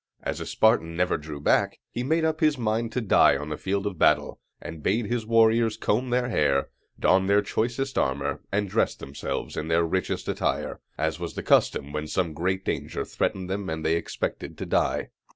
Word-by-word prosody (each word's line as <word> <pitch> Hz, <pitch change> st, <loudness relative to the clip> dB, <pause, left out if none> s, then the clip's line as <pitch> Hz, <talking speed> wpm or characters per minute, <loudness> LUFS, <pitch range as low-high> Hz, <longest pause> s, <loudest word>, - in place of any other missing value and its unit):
As -, -, -3 dB
a -, -, -5 dB
Spartan 110 Hz, -7 st, +2 dB
never 90 Hz, +1 st, +2 dB
drew 75 Hz, -1 st, -6 dB
back, 70 Hz, -, +2 dB
he 120 Hz, -, -3 dB
made 160 Hz, +5 st, +1 dB
up 160 Hz, 0 st, 0 dB
his 155 Hz, -2 st, +3 dB
mind 115 Hz, 0 st, -1 dB
to 125 Hz, -, 0 dB
die 95 Hz, -9 st, +5 dB
on 75 Hz, +2 st, -6 dB
the 75 Hz, -, -2 dB
field 100 Hz, +5 st, -2 dB
of 95 Hz, -5 st, -4 dB
battle, -, -, +3 dB, 0.2 s
and 80 Hz, -2 st, -8 dB
bade 110 Hz, +8 st, +1 dB
his 115 Hz, +1 st, -2 dB
warriors 115 Hz, -1 st, +4 dB
comb 120 Hz, +3 st, 0 dB
their 125 Hz, 0 st, +1 dB
hair, 70 Hz, -, +1 dB, 0.3 s
don 95 Hz, +1 st, +3 dB
their 100 Hz, +1 st, +4 dB
choicest 125 Hz, +4 st, -1 dB
armor, 70 Hz, +1 st, -1 dB
and 105 Hz, 0 st, 0 dB
dress -, -, +1 dB
themselves 70 Hz, +1 st, -5 dB
in 75 Hz, -, -3 dB
their 85 Hz, +1 st, +3 dB
richest 90 Hz, +2 st, -2 dB
attire, -, -, -1 dB, 0.2 s
as -, -, -1 dB
was -, -, -5 dB
the -, -, -4 dB
custom 70 Hz, +1 st, +2 dB
when 75 Hz, 0 st, -3 dB
some 85 Hz, -1 st, -1 dB
great 95 Hz, +4 st, -1 dB
danger -, -, -2 dB
threatened 95 Hz, -1 st, -2 dB
them 95 Hz, +1 st, -3 dB
and 80 Hz, 0 st, -4 dB
they 80 Hz, +1 st, +3 dB
expected 85 Hz, -, -4 dB
to -, -, -4 dB
die. -, -, 0 dB
95 Hz, 200 wpm, -26 LUFS, 80-115 Hz, 0.3 s, die